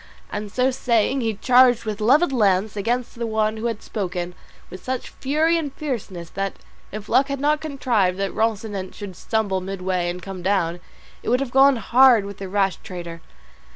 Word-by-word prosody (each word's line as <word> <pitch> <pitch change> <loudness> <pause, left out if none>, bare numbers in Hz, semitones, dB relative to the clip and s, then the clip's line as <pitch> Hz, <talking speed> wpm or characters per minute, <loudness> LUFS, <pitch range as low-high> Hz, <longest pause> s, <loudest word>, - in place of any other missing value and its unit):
And 205 0 -5
so 255 +3 +2
saying, 250 0 +1
he 225 -2 -1
charged 245 +1 +4
with 215 -1 -4
levelled 275 +7 +4
lance 205 -3 +2
against 235 +4 -1
the 235 - -1
one 220 0 0
who 225 +2 -2
had 225 -2 -4
spoken, 180 -4 -4 0.4
with 185 - -9
such 255 0 -3
fury 315 +5 +1
and 295 -4 -4
fierceness 215 - -5
that, 195 0 -2 0.4
if 210 0 -7
luck 270 +1 +3
had 280 -1 -3
not 300 +2 +1
contrived 240 -11 0
that 195 -1 -2
Rocinante 210 -4 -2
should 200 -3 -8
stumble 200 -1 -1
midway 185 -2 -2
and 175 +1 -4
come 185 0 -7
down, 175 -2 0 0.4
it - - -4
would 250 +2 +3
have 270 -2 -3
gone 270 +1 +6
hard 240 -1 +5
with 200 -1 -8
the 195 -1 -6
rash 195 -2 +1
trader. 170 -3 -8
215 Hz, 185 wpm, -22 LUFS, 190-255 Hz, 0.4 s, gone